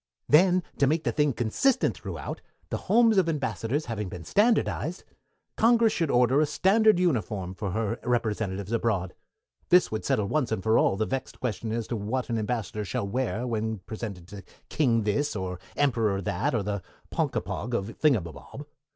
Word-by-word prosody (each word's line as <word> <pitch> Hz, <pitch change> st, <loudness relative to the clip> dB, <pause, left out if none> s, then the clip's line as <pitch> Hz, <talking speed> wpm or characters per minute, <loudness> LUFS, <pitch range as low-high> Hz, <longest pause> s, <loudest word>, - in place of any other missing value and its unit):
"Then, 180 Hz, +4 st, +5 dB, 0.2 s
to 140 Hz, -, +4 dB
make 160 Hz, +3 st, +1 dB
the -, -, 0 dB
thing 150 Hz, -1 st, +2 dB
consistent 125 Hz, -, +1 dB
throughout, -, -, -6 dB, 0.3 s
the -, -, -2 dB
homes 225 Hz, -3 st, +5 dB
of 175 Hz, -3 st, +1 dB
Ambassadors 135 Hz, -1 st, -2 dB
having 105 Hz, -5 st, -4 dB
been 85 Hz, -1 st, -8 dB
standardized, 205 Hz, -, +1 dB, 0.5 s
Congress 230 Hz, 0 st, +4 dB
should 165 Hz, -3 st, 0 dB
order 125 Hz, +3 st, +4 dB
a 155 Hz, -, +2 dB
standard 210 Hz, +7 st, +4 dB
uniform 105 Hz, -, -1 dB
for 100 Hz, +1 st, -4 dB
her 110 Hz, +4 st, -2 dB
representatives 110 Hz, -5 st, -1 dB
abroad. 105 Hz, -6 st, 0 dB, 0.6 s
This 180 Hz, -1 st, +5 dB
would 110 Hz, -, -3 dB
settle 105 Hz, -, +1 dB
once 135 Hz, -1 st, 0 dB
and 105 Hz, -4 st, -2 dB
for 110 Hz, +2 st, +3 dB
all 95 Hz, -, +2 dB
the 110 Hz, -, 0 dB
vexed 135 Hz, +2 st, -4 dB
question 115 Hz, -2 st, -3 dB
as 115 Hz, 0 st, -2 dB
to 120 Hz, -, -3 dB
what 115 Hz, +4 st, -3 dB
an 115 Hz, -, 0 dB
Ambassador 105 Hz, -2 st, -3 dB
shall 100 Hz, +1 st, -3 dB
wear 125 Hz, +2 st, -2 dB
when 110 Hz, -2 st, -2 dB
presented 100 Hz, -2 st, -7 dB
to 100 Hz, -1 st, -9 dB, 0.3 s
King 120 Hz, -7 st, +2 dB
This, 115 Hz, +7 st, 0 dB
or 90 Hz, -2 st, -4 dB, 0.2 s
Emperor 115 Hz, -8 st, +1 dB
That, 90 Hz, +5 st, -1 dB
or 110 Hz, -, 0 dB
the 100 Hz, -1 st, -3 dB, 0.3 s
Ponkapog 120 Hz, +3 st, -2 dB
of 105 Hz, +1 st, -3 dB
Thingumbob. 135 Hz, -, -1 dB
115 Hz, 170 wpm, -27 LUFS, 105-150 Hz, 0.6 s, Then